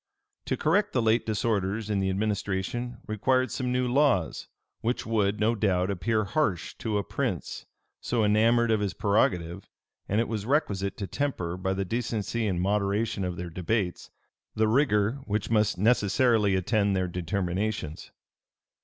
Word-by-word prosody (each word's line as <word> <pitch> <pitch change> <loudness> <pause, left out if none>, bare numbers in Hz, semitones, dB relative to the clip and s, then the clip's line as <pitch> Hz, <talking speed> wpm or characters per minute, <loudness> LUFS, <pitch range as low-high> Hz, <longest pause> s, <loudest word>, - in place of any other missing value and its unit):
To - - -1
correct 205 +7 +1
the 125 - +2
late 110 +1 +2
disorders 105 -1 -1
in 105 -2 0
the 95 0 0
administration 105 +4 -2
required 130 +4 +1
some 125 -1 -2
new 125 0 +1
laws, 125 - +1 0.3
which 120 +2 -2
would, 105 -2 +1
no 110 +2 +3
doubt, 95 -4 +1
appear 110 +3 0
harsh 100 - -1
to 110 -2 -1
a 100 - 0
prince - - -3 0.3
so 120 -2 0
enamored 115 +3 +3
of 110 - +3
his 100 -4 -2
prerogative; 90 -3 0 0.4
and 105 - +2
it 115 - +1
was 110 -3 -3
requisite 100 -9 0
to 100 - -3
temper, 95 -9 -2
by 95 +1 -2
the 95 0 -2
decency 115 +1 -2
and 90 -3 -1
moderation 100 +1 0
of 90 -1 -3
their 90 -1 -5
debates, 90 +2 -2 0.5
the 110 0 +2
rigor 110 -1 +2
which 105 +1 -2
must 105 -2 +2
necessarily 110 0 +3
attend 100 +1 +1
their 95 -1 0
determinations. 90 -1 -3
105 Hz, 155 wpm, -27 LUFS, 95-115 Hz, 0.5 s, no